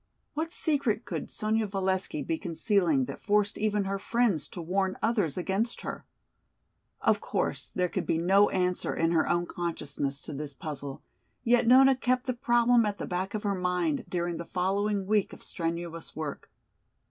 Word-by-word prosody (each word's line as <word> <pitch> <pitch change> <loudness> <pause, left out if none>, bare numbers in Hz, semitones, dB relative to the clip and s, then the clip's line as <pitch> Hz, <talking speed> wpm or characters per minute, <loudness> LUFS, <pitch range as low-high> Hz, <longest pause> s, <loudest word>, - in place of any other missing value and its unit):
What 320 +2 -2
secret 275 -10 0
could - - -4
Sonya 215 0 0
Valesky 190 -5 -1
be 165 - -1
concealing 170 - +1
that - - -7
forced 205 0 +2
even 210 -1 +1
her 195 0 -2
friends 220 -7 +1
to - - -9
warn 190 +3 -1
others 210 - +1
against 195 +6 -1
her? - - -6 0.9
Of - - +3
course - - -2
there 180 0 +2
could - - -3
be - - +2
no 195 +5 +4
answer 180 -1 0
in 165 0 +1
her 165 -2 +2
own 175 0 +2
consciousness 145 -5 -3
to 150 - -6
this 145 0 -5
puzzle, 140 -1 -6 0.4
yet 240 0 +3
Nona 265 +2 +7
kept 255 0 0
the 255 - 0
problem 240 -1 +3
at 205 -1 -1
the - - -4
back 185 +3 -3
of 210 - -3
her 200 -1 +1
mind 180 -5 0
during 175 -1 -1
the - - -4
following 195 +3 0
week 210 0 +1
of - - -12
strenuous 165 -1 -4
work. 155 -2 -5
190 Hz, 170 wpm, -29 LUFS, 170-215 Hz, 0.9 s, Nona